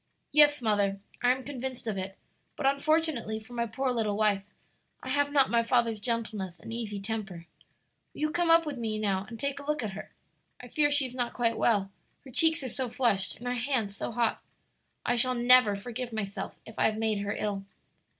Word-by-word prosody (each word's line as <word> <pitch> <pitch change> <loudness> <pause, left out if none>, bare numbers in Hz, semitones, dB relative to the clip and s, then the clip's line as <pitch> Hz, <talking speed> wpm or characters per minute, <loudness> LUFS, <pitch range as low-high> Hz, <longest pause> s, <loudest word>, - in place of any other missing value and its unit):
"Yes, 295 -3 +6
mother, 200 -3 +1 0.2
I 245 - +4
am 260 +1 -1
convinced 260 -2 -5
of 220 -3 -2
it; 195 0 -5 0.4
but 275 - -4
unfortunately 280 -5 +1
for 220 +3 -14
my 235 -1 -1
poor 260 +4 -1
little 215 -4 0
wife, 210 -2 +3 0.6
I 255 - -5
have 285 +2 +2
not 280 -2 +4
my 235 -1 +4
father's 230 -2 +1
gentleness 215 -5 -3
and 225 - -8
easy 215 -3 -4
temper. 195 -5 -5 0.7
Will - - -10
you 305 0 +1
come 345 +1 +1
up 330 0 +6
with 290 -4 -4
me 220 -2 -2
now 200 -2 0
and 230 -2 -8
take 280 0 -2
a 280 - -9
look 300 -4 0
at 210 - -3
her? 195 - -9 0.5
I 245 - -10
fear 290 +3 +2
she 285 -1 +4
is 250 - -6
not 245 -2 -2
quite 230 -2 +2
well 200 -4 +2 0.3
her 265 - -11
cheeks 320 +3 +3
are - - -3
so 255 +1 -3
flushed 230 -6 +1
and 245 - -11
her 245 - 0
hands 240 -5 -1
so - - -4
hot. 230 -1 0 0.6
I 245 - +2
shall 255 +2 +2
never 245 -3 +6
forgive 240 +4 -5
myself 205 -3 -4
if 220 - -10
I - - +4
have 215 -1 +1
made 220 -2 0
her 205 0 -2
ill." 200 -2 -3
235 Hz, 210 wpm, -29 LUFS, 210-265 Hz, 0.7 s, Yes